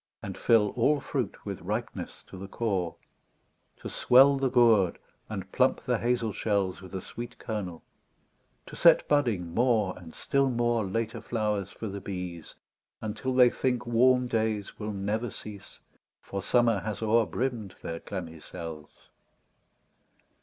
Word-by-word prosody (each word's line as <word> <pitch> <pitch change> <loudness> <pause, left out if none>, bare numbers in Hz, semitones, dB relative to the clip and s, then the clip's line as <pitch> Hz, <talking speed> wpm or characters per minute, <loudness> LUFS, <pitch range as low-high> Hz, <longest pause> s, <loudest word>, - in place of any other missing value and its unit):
And - - -5
fill 110 -3 +4
all 140 +7 +2
fruit - - -4
with - - -5
ripeness - - -4
to - - -13
the 95 +1 -7
core; 95 -6 -1 0.9
To - - -5
swell 135 +3 +6
the 135 -1 +1
gourd, 115 -7 +4 0.3
and 95 -3 -6
plump 130 0 +2
the 125 -3 0
hazel 120 -3 0
shells 100 -4 -1
With 95 0 -10
a 95 - -3
sweet 120 +4 -7
kernel; 95 -7 -5 0.8
to - - -10
set - - +6
budding 115 - +1
more. 110 -5 +2
And 85 -3 -12
still 140 -1 +1
more, 120 -2 +1
later 115 +3 -2
flowers 105 -4 -1
for - - -8
the 100 0 -5
bees. 90 -4 -6 0.4
Until 110 +4 -3
they 125 -1 +7
think 125 -2 -1
warm 125 +2 +4
days 110 -4 -1
will 105 0 -3
never 105 +4 -2
cease. 105 -1 -9 0.4
For 100 - -5
Summer 115 -3 +3
has 110 +2 -4
o'er 110 0 +3
brimm'd 120 -6 -3
their 80 0 -4
clammy 85 -4 -6
cells. 80 -2 -9
110 Hz, 145 wpm, -28 LUFS, 95-120 Hz, 0.9 s, they